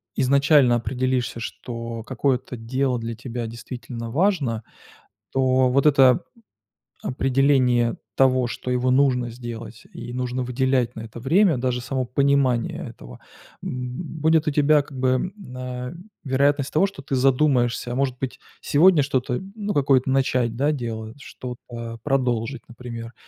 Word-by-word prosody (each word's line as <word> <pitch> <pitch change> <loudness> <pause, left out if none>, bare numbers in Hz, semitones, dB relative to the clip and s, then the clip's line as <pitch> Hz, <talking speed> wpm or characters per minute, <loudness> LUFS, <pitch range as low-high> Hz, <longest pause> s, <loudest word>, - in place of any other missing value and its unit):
изначально 140 -1 +4
определишься, 125 0 -1
что 115 0 -6
какое-то 130 +1 -1
дело 125 +2 -1
для 115 0 -4
тебя 120 0 -5
действительно 115 0 -7
важно, 145 - +1 0.7
то 130 -1 +3
вот 140 +3 +2
это 135 -4 +6 0.9
п - - -4
определение 130 -2 +2 0.2
того, 130 -2 +3
что 125 +1 -5
его 125 0 +1
нужно 130 -2 +3
сделать 115 -2 -8
и 120 - -7
нужно 125 0 -2
выделять 125 -1 0
на 115 - -6
это 115 +1 -9
время, 165 - +3
даже 125 0 -1
само 130 +1 -2
понимание 130 -1 +1
этого, - - -13 0.4
м, 125 +6 -5
будет 160 0 +3
у - - +3
тебя 150 +1 +4
как 140 -2 -12
бы, 130 0 +1
м, 130 +9 0 0.2
а, 125 0 -5 0.3
вероятность 140 +1 +1
того, 170 +6 +3
что 195 -8 -10
ты 135 0 -3
задумаешься, 125 -2 +2
а - - -3
может 130 -1 0
быть, 130 -2 -4 0.2
сегодня 160 0 +5
что-то, 130 -2 -1
ну, 205 -1 -3
какое-то 135 -2 +3
начать, 125 -3 +1
да, 140 +5 +2
делать, 115 -3 -5
что-то 120 -3 -8
продолжить, 125 -3 0
например, 115 -1 -8
130 Hz, 140 wpm, -23 LUFS, 120-140 Hz, 0.9 s, это